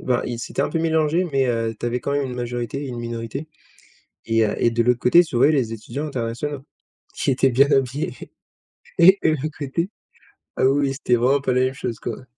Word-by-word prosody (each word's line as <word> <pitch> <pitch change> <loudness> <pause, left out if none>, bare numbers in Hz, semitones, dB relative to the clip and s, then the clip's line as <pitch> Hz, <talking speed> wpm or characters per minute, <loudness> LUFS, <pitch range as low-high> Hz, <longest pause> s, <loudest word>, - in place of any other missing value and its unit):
ben, 125 -1 0
ils 120 -1 -4
s'étaient 120 - -3
un - - 0
peu 165 - -1
mélangés 160 +1 +1
mais, 135 -1 +2
heu, 115 -2 -1
tu - - -3
avais 120 +1 -1
quand 140 - -3
même 145 0 0
une 125 - -6
majorité 120 +2 -4
et - - -6
une 120 -2 -6
minorité 115 +5 -5 0.8
et 115 0 +2
heu 105 - -2
et 120 - +3
de 115 0 +1
l'autre 125 +1 +2
côté 170 +8 +6
tu 155 - -5
voyais 140 +6 +5
les 125 -7 0
étudiants 115 +7 -5
internationaux, 135 +2 -4 0.5
qui - - 0
étaient 135 0 +2
bien 135 +4 +4
habillés 135 +2 0 0.9
et 190 +3 +7
de - - +3
l'autre 155 0 -3
côté, 160 +6 -2 0.7
ah - - +1
oui 135 +2 +3
oui 135 - -2
c'était 130 -2 +1
vraiment 130 +4 +2
pas 130 -2 0
la 125 - +2
même 130 - -1
chose 120 -4 -5
quoi. - - -6
130 Hz, 225 wpm, -22 LUFS, 120-145 Hz, 0.9 s, et